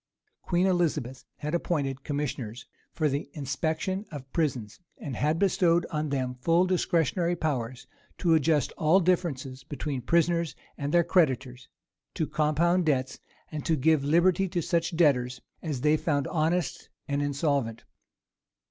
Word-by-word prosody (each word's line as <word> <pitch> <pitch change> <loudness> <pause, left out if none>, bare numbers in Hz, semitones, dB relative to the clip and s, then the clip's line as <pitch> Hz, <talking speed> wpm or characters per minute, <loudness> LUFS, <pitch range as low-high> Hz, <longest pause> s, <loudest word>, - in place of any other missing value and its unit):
Queen 175 +1 +1
Elizabeth 155 -9 0
had 150 +2 -4
appointed 140 -6 -1
commissioners 135 -5 -4 0.3
for 155 - 0
the 140 0 -2
inspection 160 +7 -2
of 135 -3 -9
prisons, 130 - -1 0.2
and 135 -4 -6
had 150 +4 +1
bestowed 175 -2 +3
on 155 -1 -1
them 130 -2 -1
full 170 +4 +3
discretionary 175 -1 +1
powers 130 -6 -3 0.3
to 170 -3 +2
adjust 155 -1 +2
all 160 +5 +5
differences 160 -8 -1
between 145 -3 -4
prisoners 170 +3 +1 0.2
and 140 0 -3
their 175 +1 +4
creditors, 130 -7 +1 0.5
to 160 - 0
compound 160 +5 +2
debts, 130 -4 0 0.3
and 155 -2 -4
to 160 - +2
give 155 0 +3
liberty 175 +6 +3
to 175 0 -1
such 170 +1 -1
debtors 125 -6 +3 0.2
as 150 -7 -3
they 150 +2 +4
found 145 -3 0
honest 165 -1 -1 0.2
and 140 0 0
insolvent. 140 -5 -1
155 Hz, 140 wpm, -28 LUFS, 135-170 Hz, 0.5 s, all